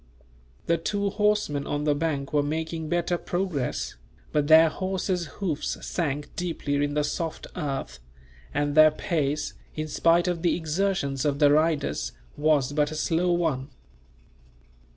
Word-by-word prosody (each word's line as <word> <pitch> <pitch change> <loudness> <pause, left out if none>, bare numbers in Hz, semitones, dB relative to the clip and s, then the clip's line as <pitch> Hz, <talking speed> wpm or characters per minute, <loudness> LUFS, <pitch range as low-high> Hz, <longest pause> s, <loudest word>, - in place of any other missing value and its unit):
The 170 -1 +2
two 200 +3 -1
horsemen 210 -9 +1
on 145 0 -1
the 150 -1 +3
bank 145 -2 -2
were 145 - +4
making 160 +2 -3
better 175 +1 0
progress, 155 - -2 0.3
but 150 -1 +1
their 160 +1 +8
horses' 185 0 -2
hoofs 170 -7 -2
sank 145 -4 -3
deeply 170 -5 -3
in 145 0 -1
the 150 - +2
soft 160 +2 -3
earth; 135 - -4 0.5
and 145 - 0
their 155 +1 +8
pace, 155 -1 -1 0.2
in 155 0 -3
spite 170 +3 +3
of 175 -2 -1
the 175 - +2
exertions 160 -4 -1
of 145 -2 +1
the 145 -1 +5
riders, 155 - +1 0.2
was 145 -2 +2
but 150 0 +2
a 155 - -6
slow 170 +3 +1
one. 155 -6 0
155 Hz, 145 wpm, -26 LUFS, 145-175 Hz, 0.5 s, their